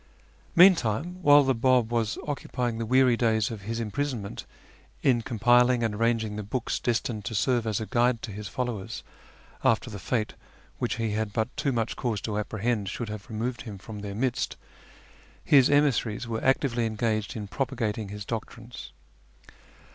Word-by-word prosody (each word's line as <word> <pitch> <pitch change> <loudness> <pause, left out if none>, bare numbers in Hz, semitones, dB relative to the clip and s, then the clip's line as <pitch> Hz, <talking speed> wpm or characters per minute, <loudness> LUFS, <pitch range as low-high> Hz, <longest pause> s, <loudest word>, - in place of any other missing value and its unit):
Meantime, 175 - +4
while 145 -3 +7
the 135 0 +2
Bab 125 -1 +2
was 115 -2 0
occupying 125 -5 -2
the 115 - -3
weary 130 0 +5
days 110 -2 +1
of 110 -3 -6
his 115 +3 -4
imprisonment 115 -1 -3 0.6
in 125 -3 +3
compiling 120 +1 +3
and 110 -2 0
arranging 110 -1 0
the - - -2
books 110 +4 -2
des 120 - +1
tined 110 -2 -3
to 110 - -4
serve 120 +2 +1
as 105 -2 0
a 110 - -3
guide 120 0 +2
to 110 - -5
his 105 +1 -6
followers 115 -2 -4 0.6
after 115 +1 +2
the 105 - -6
fate 110 +3 -1 0.5
which - - -1
he 115 -2 -1
had 110 0 -1
but 110 +4 -2
too 150 -2 0
much 115 -2 -1
cause 115 -5 -2
to 105 +1 -3
apprehend 105 -1 -1
should 115 +2 -4
have 105 -1 -7
removed 115 +2 -3
him 105 -5 -7
from 105 +2 -9
their 100 -1 -6
midst, 125 +2 -1 0.9
his 135 -3 +6
emissaries 130 -5 +2
were 115 -1 -3
actively 130 -3 +2
engaged 110 +1 -1
in 105 -2 -5
propagating 110 -3 -2
his 105 0 -7
doctrines. 115 +1 -7
115 Hz, 170 wpm, -27 LUFS, 110-125 Hz, 0.9 s, while